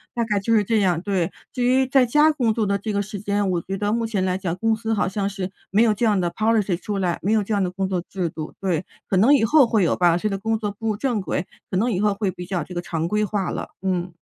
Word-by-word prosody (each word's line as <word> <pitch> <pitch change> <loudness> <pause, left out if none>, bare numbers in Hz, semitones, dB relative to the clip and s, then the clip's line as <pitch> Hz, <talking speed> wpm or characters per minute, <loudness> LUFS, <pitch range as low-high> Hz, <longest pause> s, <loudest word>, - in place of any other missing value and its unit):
大 235 - +1
概 210 -2 0
就 230 +4 +1
是 210 - +4
这 220 +2 +1
样。 180 -4 +2
对， 185 -2 -1 0.2
至 250 - -3
于 260 +2 +3
在 260 -1 +3
家 300 +6 +5
工 250 -7 +1
作 225 -2 +1
的 200 0 +1
这 215 +2 -3
个 200 0 0
时 205 0 -7
间， 205 0 0
我 175 -2 0
觉 195 +3 -5
得 205 +1 0
目 230 0 0
前 200 -4 -1
来 185 -1 0
讲 185 -3 -2
公 225 +4 +1
司 225 0 -2
好 210 - +1
像 195 +1 -1
是 195 -2 -5 0.2
没 210 +4 +4
有 225 -2 +4
这 230 +3 0
样 205 -3 +2
的 175 -1 0
Policy 215 -3 +1
出 205 -1 -3
来， 180 -3 -1
没 205 +4 +1
有 215 -2 +3
这 215 - -3
样 200 -1 +2
的 180 - 0
工 190 +1 -2
作 185 -2 -1
制 180 -3 -2
度， 155 -1 -7
对， 180 -4 -1 0.2
可 - - 0
能 230 +10 +6
以 265 - +2
后 290 +1 +5
会 220 -3 +2
有 170 - +2
吧， 175 -1 +3
这 195 - -1
个 195 -1 -3
工 225 +2 0
作 210 -2 -3
步 225 +3 -6
入 215 - +1
正 245 -2 0
轨， 185 -1 -2 0.2
可 - - -3
能 235 +5 +1
以 185 - -1
后 210 0 +2
会 200 -1 -1
比 180 0 -8
较 175 -3 -2
这 180 - -10
个 175 - -2
常 165 -2 -2
规 210 +1 +1
化 200 -2 -2
了。 - - -4
嗯。 180 -2 -2
200 Hz, 345 characters per minute, -23 LUFS, 185-225 Hz, 0.2 s, 能